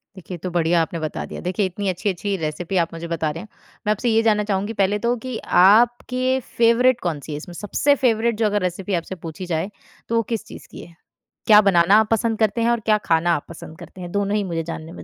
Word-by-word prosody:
देखिए, 185 -1 -8
ये - - -8
तो 185 - -2
बढ़िया 170 0 +2
आपने 165 +1 -3
बता 155 -1 -4
दिया। - - -8
देखिए, 185 +3 -1
इतनी 190 +1 -3
अच्छी-अच्छी 195 +2 -2
रेसिपी 165 +3 -3
आप 170 -2 0
मुझे 165 0 -6
बता 165 -2 -1
रहे 165 +3 -7
हैं, - - -12 0.4
मैं - - +4
आपसे 215 +3 0
ये 225 0 +3
जानना 210 -2 +2
चाहूँगी 205 +1 -2
पहले 205 +2 +1
तो 240 - +2
कि 255 -3 -4 0.2
आपके 245 +5 +3 0.2
फ़ेवरेट 235 +2 +4
कौन-सी 155 -3 -4
है 145 - -3
इसमें? 170 +4 -9
सबसे 210 - +1
फ़ेवरेट 235 -3 +1
जो 225 - +1
अगर 205 -1 +1
रेसिपी 185 +2 -3
आपसे 175 +2 -2
पूछी 165 +3 -6
जाए, 175 +2 -2 0.4
तो 230 - 0
वो 230 - +3
किस 220 - -3
चीज़ - - -12
की - - -10
है? 170 - -18 0.5
क्या 210 -1 +8
बनाना 190 -1 +4
आप 220 - +1
पसंद 225 0 +1
करते 220 +1 +1
हैं 230 - +2
और 235 - +1
क्या 215 -1 +4
खाना 170 +1 +2
आप 145 - -5
पसंद 160 0 -11
करते 175 +2 -12
हैं? 175 -1 -7
दोनों 205 +1 0
ही 210 - 0
मुझे 165 -3 -3
जानने 160 0 -7
में - - -10
195 Hz, 245 wpm, -21 LUFS, 170-220 Hz, 0.5 s, क्या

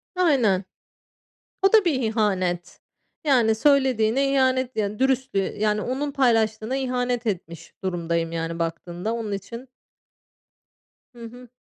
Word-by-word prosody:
Aynen. 250 - +2 1.0
O 390 +2 +3
da 430 -3 +6
bir 300 -7 +1
ihanet. 190 -6 -1 0.4
Yani, 240 -7 +3
söylediğine 265 0 +2
ihanet 260 -1 +1
yani; 210 -1 -2
dürüstlüğe 260 -7 0
Yani, 210 0 +1
onun 280 +3 -2
paylaştığına 225 -3 +1
ihanet 250 -2 -1
etmiş 170 -5 -5
durumdayım 170 -2 -1
yani, 165 0 -4
baktığında 175 +5 -3
onun 225 -3 -4
için 230 +6 -7 1.4
Hı 240 -2 -13
hı. 245 +1 -12
225 Hz, 115 wpm, -24 LUFS, 195-260 Hz, 1.4 s, da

